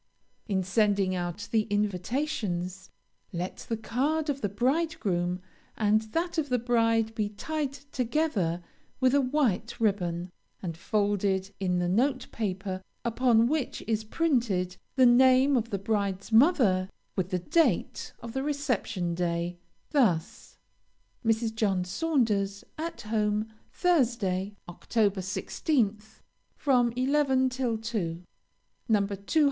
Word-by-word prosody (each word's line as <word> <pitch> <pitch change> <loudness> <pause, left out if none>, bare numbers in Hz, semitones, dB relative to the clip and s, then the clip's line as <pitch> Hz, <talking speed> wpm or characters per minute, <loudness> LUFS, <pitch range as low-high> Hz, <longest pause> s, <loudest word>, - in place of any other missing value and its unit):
In 190 -3 0
sending 200 -1 +2
out 175 +2 -3
the 220 -2 +2
invitations, 200 - -2 0.4
let 180 0 -4
the 225 - 0
card 290 +8 0
of 275 -1 -6
the 205 - 0
bridegroom 205 - 0 0.4
and 215 0 +3
that 340 0 0
of 290 -3 -2
the 250 - +2
bride 230 -2 +2
be 215 -2 -1
tied 285 +7 -3
together 250 - -1 0.4
with 260 0 +3
a 285 - +5
white 255 -6 0
ribbon, 180 -5 0 0.3
and 170 -4 -5
folded 200 0 0
in 180 -2 0
the 175 0 0
note 255 +9 +1
paper 190 -3 -3 0.2
upon 235 -1 +3
which 295 -1 -2
is 220 -1 0
printed 220 - 0 0.2
the 260 -2 +6
name 260 +3 +6
of 235 -2 0
the 200 - -1
bride's 200 -1 -2
mother, 220 - +4 0.3
with 185 -2 -1
the 185 - 0
date 280 - +1
of 230 -1 -7
the 265 - -1
reception 250 -11 -1
day, 170 0 -2 0.3
thus: 190 - 0 0.7
MRS. 225 0 +1
JOHN 200 -5 +1
SAUNDERS. 200 - 0 0.2
At 330 +1 -4
home, 215 0 -1 0.2
Thursday, 225 - +1
Oct. 175 - -12
16th, 215 - 0 0.3
from 250 -4 +3
11 265 0 +2
till 250 -3 -1
2. 195 -7 -3 0.7
No. 205 -3 +3
220 Hz, 120 wpm, -28 LUFS, 190-260 Hz, 0.7 s, the